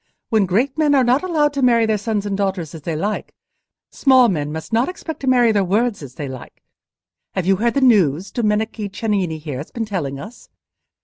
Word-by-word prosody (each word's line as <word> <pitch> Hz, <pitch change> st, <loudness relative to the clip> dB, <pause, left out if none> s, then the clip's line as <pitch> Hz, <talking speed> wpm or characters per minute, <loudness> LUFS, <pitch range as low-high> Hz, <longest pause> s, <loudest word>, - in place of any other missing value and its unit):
"When 215 Hz, -5 st, +2 dB
great 255 Hz, -, 0 dB
men 295 Hz, -2 st, +3 dB
are 265 Hz, -, +4 dB
not 250 Hz, +4 st, +3 dB
allowed 310 Hz, -5 st, +1 dB
to 280 Hz, -, -2 dB
marry 235 Hz, -3 st, +4 dB
their 215 Hz, -1 st, 0 dB
sons 210 Hz, -1 st, -2 dB
and 200 Hz, -1 st, -2 dB
daughters 190 Hz, -5 st, -2 dB
as 160 Hz, -, -9 dB
they 165 Hz, +2 st, -3 dB
like, 205 Hz, +7 st, -3 dB, 0.6 s
small 260 Hz, -3 st, +4 dB
men 150 Hz, -5 st, -2 dB
must 160 Hz, +8 st, -7 dB
not 235 Hz, +6 st, +2 dB
expect 340 Hz, -3 st, -7 dB
to 270 Hz, -, -6 dB
marry 245 Hz, -3 st, +4 dB
their 205 Hz, -2 st, +2 dB
words 210 Hz, +3 st, 0 dB
as 130 Hz, -3 st, -10 dB
they 145 Hz, -, -5 dB
like. 130 Hz, -1 st, -10 dB, 0.7 s
Have 190 Hz, -, -1 dB
you 190 Hz, 0 st, +3 dB
heard 235 Hz, +5 st, 0 dB
the 275 Hz, -, +2 dB
news 190 Hz, -, +3 dB
Domenico 215 Hz, -1 st, -1 dB
Cennini, 195 Hz, -5 st, -2 dB
here, 150 Hz, -4 st, -6 dB
has 145 Hz, -, -7 dB
been 230 Hz, -1 st, -4 dB
telling 155 Hz, -10 st, -4 dB
us? 220 Hz, +9 st, -11 dB
210 Hz, 210 wpm, -20 LUFS, 175-245 Hz, 0.7 s, are